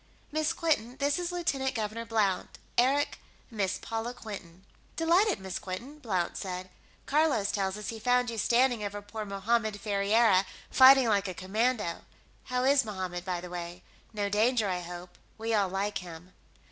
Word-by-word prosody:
Miss 310 0 +1
Quinton, 255 -7 0
this 285 +3 +1
is 350 0 -2
Lieutenant 275 -7 -1
Governor 220 +1 -3
Blount. 210 -5 0 0.2
Eric, 275 +4 +2 0.3
Miss 200 -4 -1
Paula 225 +2 -4
Quinton." 190 -5 -9 0.3
"Delighted, 350 +5 +3
Miss 190 -2 -5
Quinton," 240 +11 -7
Blount 185 - -1
said. 185 -1 -5 0.3
"Carlos 285 -9 +2
tells 195 -1 -1
us 210 - -5
he 225 - -5
found 245 +1 +2
you 225 - -4
standing 240 -1 +3
over 205 0 -4
poor 215 +1 -6
Mohammed 210 +2 0
Ferriera, 200 -1 +3 0.2
fighting 265 -1 +8
like 200 -3 +2
a 185 - -5
commando. 210 0 -1 0.4
How 250 -1 -1
is 275 +1 +5
Mohammed, 185 -5 -4
by 180 -2 -3
the 180 - -8
way? 175 0 -6 0.3
No 205 -2 -1
danger, 220 +2 +2
I 180 -2 -1
hope; 175 0 -9 0.2
we 225 +1 -2
all 200 -3 +2
like 200 +2 -1
him." 175 0 -11
215 Hz, 160 wpm, -29 LUFS, 190-250 Hz, 0.4 s, fighting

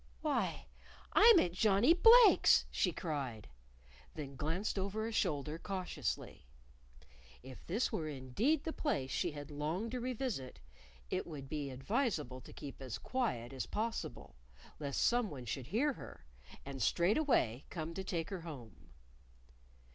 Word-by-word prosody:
"Why, - - -1 0.5
I'm 450 0 +8
at 180 - +3
Johnnie 210 - +4
Blake's!" 455 +5 +7
she - - +1
cried 135 - -4 0.7
then 140 -3 -6
glanced 165 +9 -2
over 200 +3 -2
a 230 - -3
shoulder 155 -6 -1
cautiously. 185 - -4 1.0
If 130 0 -11
this 215 +9 0
were 155 - -2
indeed 150 - 0
the 320 - -3
place 135 - -1
she 175 -4 -1
had 145 0 -8
longed 160 +10 -2
to 250 - -2
revisit, 245 - -3 0.5
it - - -1
would 145 -5 -7
be 145 -1 -3
advisable 150 - -1
to - - -13
keep 140 -1 -9
as 130 -3 -5
quiet 135 - -2
as 130 - -4
possible, 225 +2 -4 0.4
lest 140 -2 -1
someone 210 - +1
should 125 +2 -4
hear 260 - +1
her, 70 - -11 0.4
and 135 -1 -6
straightway 175 - +2
come 165 -1 -5
to 190 - -4
take 170 -2 -3
her 190 -3 -4
home. 130 - -10
165 Hz, 140 wpm, -35 LUFS, 135-225 Hz, 1.0 s, I'm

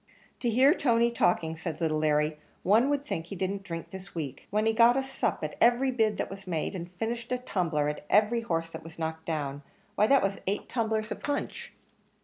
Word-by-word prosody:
"To 240 - 0
hear 260 +6 +5
Tony 235 -7 +2
talking," 165 -7 +1
said 160 -1 -5
little 155 -2 +1
Larry, 150 0 +1 0.2
"one 220 +8 +4
would 285 -1 0
think 165 - -3
he 195 - -6
didn't 195 +2 -2
drink 165 -4 -7
this 190 0 -9
week; 150 -5 -5
when 215 +2 +1
he 225 - +3
got 235 +2 +6
a 270 - +1
sup 265 - -2
at - - -3
every 245 +3 +4
bid 220 -4 +1
that - - -1
was 195 0 -10
made, 165 0 -2
and 175 -1 -5
finished 230 +5 -4
a 250 - +2
tumbler 170 - -1
as 150 - -2
every 220 +3 +4
horse 165 -6 -2
was 165 0 -12
knocked 160 0 -4
down; 145 -3 -2 0.3
why 210 - +3
that 275 +2 +5
was 195 0 -1
eight 200 +2 -1
tumblers 220 -2 -1
of - - -5
punch!" 290 0 -3
195 Hz, 210 wpm, -29 LUFS, 165-235 Hz, 0.3 s, got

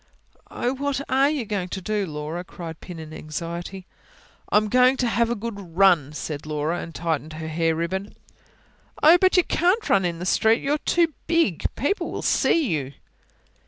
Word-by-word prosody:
"Oh, 245 - -2
what 280 0 -2
ARE 270 +2 +4
you 290 -6 -2
going 195 -3 -3
to 190 - -4
do, 205 +1 -2
Laura?" 155 +3 -5
cried 165 -3 -9
Pin, 180 -2 -9
in 155 -1 -9
anxiety. 170 +4 -6 0.7
"I'm 210 +1 +4
going 255 +4 +4
to 250 - +1
have 230 +1 +1
a 240 - 0
good 200 -6 -7
run," 175 -8 +5
said 150 0 -5
Laura; 155 +3 -1
and 165 - -9
tightened 160 -2 -2
her 160 0 -6
hair 165 +1 0
ribbon. 190 +5 -3 0.9
"Oh, 330 +4 +8
but 375 0 +4
you 360 - +6
can't 365 +8 +1
run 195 - +4
in 170 -2 -1
the 175 - -5
street! 220 +4 +3
You're 290 +2 0
too 335 0 +1
big. 330 - +1
People'll 290 - -2
see 325 -5 +2
you." 140 -4 -2
190 Hz, 175 wpm, -24 LUFS, 165-255 Hz, 0.9 s, Oh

